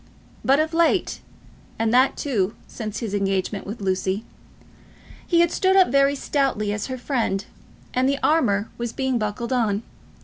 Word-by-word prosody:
But 275 +2 +4
of 315 +1 0
late, 335 0 +2 0.6
and 225 0 0
that, 255 +2 +4
too, 215 -8 -1
since 215 -1 -6
his 220 -4 -4
engagement 195 0 -1
with 210 +2 -6
Lucy, 190 +2 -1 1.0
he 340 -1 +4
had 345 - +3
stood 380 0 +2
up 380 -1 +6
very 275 +2 +3
stoutly 265 -8 0
as 210 - -3
her 260 -1 -4
friend, 230 -7 -1 0.5
and 255 +1 +2
the 280 - +1
armour 215 -10 +2
was 235 -1 -3
being 265 -2 0
buckled 215 +4 -2
on. 220 -4 +1
235 Hz, 160 wpm, -23 LUFS, 205-275 Hz, 1.0 s, up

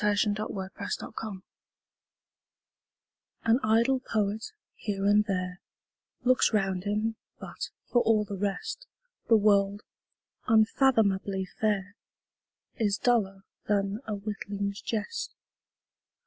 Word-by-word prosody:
Coventry 210 0 +3
Patmore 200 -2 -4
The - - -5
Revelation 205 -4 -6 2.0
AN 230 +2 +4
idle 230 +4 +3
poet, 215 - -1 0.2
here 200 -2 -3
and 205 +1 +5
there, 185 -2 -2 0.6
Looks 255 +1 +4
round 195 -3 0
him, 215 +2 0 0.2
but, - - -6 0.2
for 240 - +3
all 220 -2 +3
the 205 - -5
rest, 210 - -3 0.4
The 225 - +7
world, 205 -1 +3 0.6
unfathomably 215 -4 +3
fair, 205 0 -1 0.8
Is 205 -3 +1
duller 195 -6 +1 0.2
than 200 0 +1
a 215 - -1
witling's 200 -1 -4
jest. 225 - -3
210 Hz, 105 wpm, -29 LUFS, 200-225 Hz, 2.0 s, The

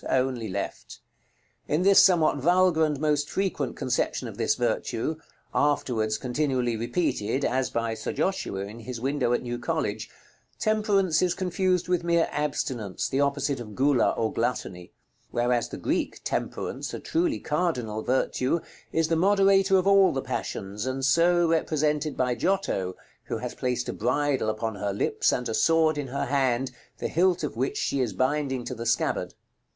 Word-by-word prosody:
only 125 -4 0
left. 100 +1 -5 0.7
In 155 +4 +1
this 195 0 +7
somewhat 165 -6 +4
vulgar 175 +2 +3
and 150 -3 -2
most 150 -1 +1
frequent 185 -8 -2
conception 125 -1 -1
of - - -8
this - - +1
virtue 155 +8 -1 0.4
(afterwards 115 -7 +1
continually 125 -2 -1
repeated, 120 +1 -1
as 130 +1 0
by 115 -1 -1
Sir - - -4
Joshua 190 - -1
in 105 +4 -7
his 115 +1 -6
window 135 -1 0
at 120 - +1
New 120 0 -4
College) 110 -3 -2 0.5
temperance 205 -6 +2
is 180 -1 +1
confused 185 -1 0
with 180 -1 +1
mere 170 -1 +2
abstinence, 130 -9 -2
the 135 - 0
opposite 140 -1 0
of 105 -3 -8
Gula, 135 -2 +3
or 110 -1 0
gluttony; 105 -7 -3 0.4
whereas 120 -1 0
the - - -6
Greek - - -2
Temperance, - - -3
a - - -5
truly 330 -1 0
cardinal 130 -10 -1
virtue, 130 +4 0 0.3
is 165 -1 +1
the 165 - +1
moderator 195 +1 +4
of 185 - +1
all 195 -1 +6
the 135 - -3
passions, 100 +5 -4
and 130 0 -1
so 170 +4 +4
represented 155 -2 0
by 125 -1 +1
Giotto, 120 - -1 0.3
who - - -3
has - - -5
placed 125 -1 -2
a - - -3
bridle 135 +1 0
upon 110 +1 -2
her 100 -1 -3
lips, 100 - +1
and 125 - -1
a 115 - -2
sword 160 +7 +3
in 140 - -3
her 135 +2 -2
hand, 130 -2 +1 0.3
the - - -2
hilt 180 0 +2
of 150 - -3
which 130 +4 -1
she 140 - 0
is 120 - -1
binding 130 -1 0
to - - -4
the 115 -1 -5
scabbard. - - 0
140 Hz, 165 wpm, -26 LUFS, 120-170 Hz, 0.7 s, this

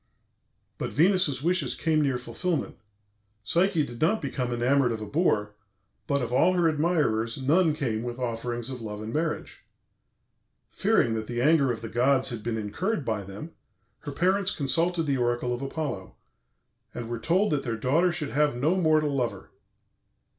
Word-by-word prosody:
But - - -2
Venus's 165 -5 +2
wishes 180 +3 0
came 155 -1 +1
near 135 -4 +1
fulfilment. 125 +8 -3 0.7
Psyche 170 - +2
did 120 -1 -10
not 205 +8 +3
become 130 -3 -3
enamoured 125 +2 +2
of 115 - -3
a 110 - -5
boor, 105 - 0 0.5
but 140 -3 +1
of 120 0 -4
all 180 +8 +4
her 175 -2 +3
admirers 150 -8 +1
none 155 +4 +3
came 120 -8 -2
with 120 0 -5
offerings 120 0 -3
of 125 -2 -6
love 105 -1 -6
and 110 +1 -6
marriage. 160 0 -3 1.1
Fearing 115 - +2
that 110 -1 -3
the 120 0 -3
anger 140 0 +4
of 110 -2 -5
the 115 - -5
gods 130 +4 +2
had 115 -2 -5
been 115 0 -2
incurred 145 - -2
by 110 -3 -1
them, 100 - -9 0.5
her 145 - -7
parents 185 +6 +1
consulted 165 +5 +2
the 140 -3 0
oracle 120 0 0
of 120 - -4
Apollo, 135 -8 -4 0.8
and 120 -1 -5
were 120 0 -4
told 180 - +1
that 145 -2 +1
their 115 -4 -3
daughter 160 +10 +2
should 150 -4 -4
have 150 -1 +2
no 150 +9 +1
mortal 155 -5 +2
lover. 125 -3 -3
135 Hz, 170 wpm, -27 LUFS, 120-160 Hz, 1.1 s, all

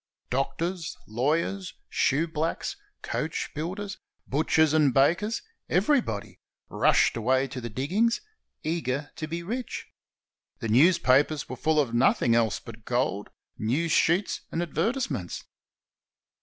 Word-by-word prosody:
Doctors, 165 +6 -2
lawyers, 160 - -1 0.2
shoeblacks, 160 - 0 0.3
coachbuilders, 190 +6 -3 0.3
butchers 155 +2 +2
and 150 -3 +4
bakers 170 - +2
— - - -50
everybody 245 - 0 0.2
— - - -67
rushed - - +3
away 130 +4 +2
to 125 0 -6
the 120 - -5
diggings, 185 - +1 0.4
eager 150 -3 -2
to 155 - -4
be 170 +2 -4
rich. 235 +6 -4 0.7
The 115 - -4
newspapers 145 +1 +4
were 130 - -5
full 155 +4 +2
of 130 -6 +1
nothing 120 -1 +3
else 115 -4 +2
but 115 -1 -12
gold, 120 -5 -1 0.3
news 145 +10 0
sheets, 170 +5 +2
and 170 - -1
advertise 195 - -1
ments. 95 -10 -4
150 Hz, 120 wpm, -27 LUFS, 125-170 Hz, 0.7 s, and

